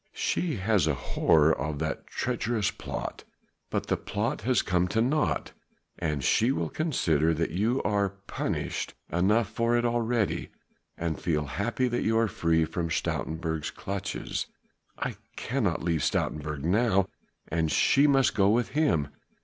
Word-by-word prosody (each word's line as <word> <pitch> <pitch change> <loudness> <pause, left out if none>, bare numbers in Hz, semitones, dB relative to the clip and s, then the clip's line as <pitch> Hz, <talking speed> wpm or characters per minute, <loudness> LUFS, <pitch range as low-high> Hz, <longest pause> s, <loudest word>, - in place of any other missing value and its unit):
"She 170 -5 0
has 100 -4 +2
a 75 - +2
horror 80 +3 +3
of 75 +1 -3
that 80 -1 -3
treacherous 120 -4 -1
plot. - - -6 0.5
But - - -1
the - - 0
plot 105 +3 -2
has 125 +3 +2
come 90 0 +1
to 110 - 0
naught; 145 +6 +1 0.5
and 75 -4 -1
she 115 - +3
will 85 - -1
consider 80 - +1
that 80 +1 -1
you 110 +9 +1
are 100 -1 +1 0.2
punished - - -3 0.2
enough 100 +6 +3
for 115 +1 +1
it 120 - +1
already, 120 -2 0 0.5
and 80 -2 -3
feel 75 -3 0
happy 115 - -1
that 120 0 -1
you 110 0 +2
are 115 0 +3
free 80 -4 +1
from 85 +1 -3
Stoutenburg's 80 -1 -2
clutches." 100 +1 -4 0.5
"I - - -3 0.2
cannot 110 -11 -1
leave 85 -3 +1
Stoutenburg 75 -1 -1
now, 100 +2 +3 0.4
and 80 -1 0
she 140 +2 +4
must 135 -2 +4
go 100 -1 +4
with 115 +2 +2
him. 135 - +2
100 Hz, 150 wpm, -28 LUFS, 80-120 Hz, 0.5 s, she